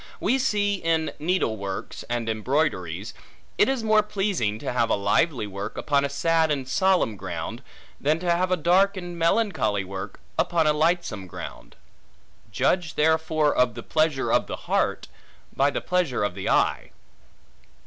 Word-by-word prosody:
We 265 - +1
see 205 -5 +1
in 165 -2 0
needle 155 -8 0
works 100 -1 -5
and 120 -1 -2
embroideries, 110 - -1 0.5
it - - +5
is 265 -4 -1
more 215 -1 +4
pleasing 195 - -1
to - - -4
have 115 -2 +1
a - - +3
lively 105 +6 +1
work, 100 +1 -6
upon 140 -2 +1
a 140 - 0
sad 160 +3 +2
and 135 -3 -1
solemn 185 - +2
ground, - - -5 0.4
than 150 +3 +2
to 175 -1 +1
have 180 +2 +1
a 185 - +2
dark 190 +5 +3
and 175 -1 -6
melancholy 165 - +1
work, 95 +1 -7 0.2
upon 170 -2 +2
a 150 - +4
lightsome 155 - 0
ground: - - -9 0.8
judge 170 - 0
therefore 160 -1 +2
of 125 -3 +2
the 120 - -7
pleasure 155 -4 +1
of - - +2
the - - -4
heart, - - 0 0.5
by 140 +1 +3
the 145 - -3
pleasure 180 - 0
of 105 - -1
the 95 +1 -4
eye. - - +1
155 Hz, 160 wpm, -25 LUFS, 110-180 Hz, 0.8 s, it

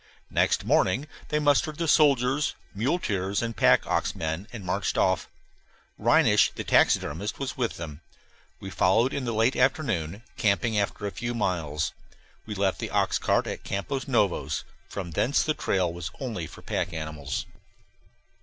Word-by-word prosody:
Next - - +2
morning 130 +11 +2 0.2
they 150 - 0
mustered 150 +1 +2
their 170 - -1
soldiers, 145 -2 +3 0.2
muleteers, 100 - 0
and 115 -1 -3
pack - - +4
ox - - 0
men 80 +5 -3
and 110 -6 -8
marched 90 - -1
off. - - +2 0.7
Reinisch - - +4
the - - -4
taxidermist 90 +8 +2
was 135 -2 -4
with 125 -5 -2
them. 80 -2 -7 0.6
We 95 - -7
followed 110 +9 +3
in 140 - -2
the 120 - -1
late 115 +3 +2
afternoon, 110 - 0
camping 110 +2 +1
after 100 0 -2
a 100 - -2
few 120 +3 -4
miles. 80 -7 -1 0.6
We 105 - -4
left 95 -1 0
the - - -3
oxcart - - +1
at - - -5
Campos 135 +9 -3
Novos; 105 -8 +1 0.3
from 95 -4 -5
thence 130 - +2
on - - -6
the - - -15
trail 90 -3 +1
was 85 0 -5
only 110 - -4
for - - -13
pack 90 - -2
animals. 75 -4 -4
105 Hz, 155 wpm, -27 LUFS, 90-130 Hz, 0.7 s, pack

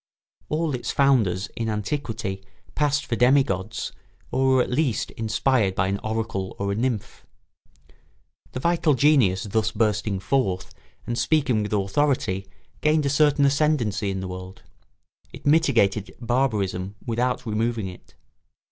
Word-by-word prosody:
All 155 -1 0
its 125 - -4
founders 115 -9 +2
in 115 -1 -2
antiquity 105 -3 -3 0.3
passed 145 -1 +1
for 115 - -1
demi 130 +4 +5
gods 95 -1 -4 0.4
or 130 +1 +1
were 130 - +4
at - - -6
least 130 -4 0
inspired 110 -2 +1
by 95 +1 +1
an 100 +1 -1
oracle 110 -3 -3
or 100 0 -2
a - - -1
nymph. 115 -2 -3 1.3
The - - -3
vital 165 -1 +2
genius 125 -9 +3
thus 110 +1 0
bursting 105 -2 0
forth 95 -5 -1 0.3
and 120 0 -2
speaking 135 -8 +2
with 105 - -4
authority 100 -2 0 0.3
gained 150 -1 +2
a 140 - +1
certain 145 0 +4
ascendency 135 -8 +1
in 95 -1 -3
the 95 - -4
world; 95 +1 -8 0.7
it - - -12
mitigated 120 - +2
barbarism 105 -6 -1
without 125 +2 -1
removing 110 -1 -1
it. 90 - -12
115 Hz, 140 wpm, -24 LUFS, 100-135 Hz, 1.3 s, demi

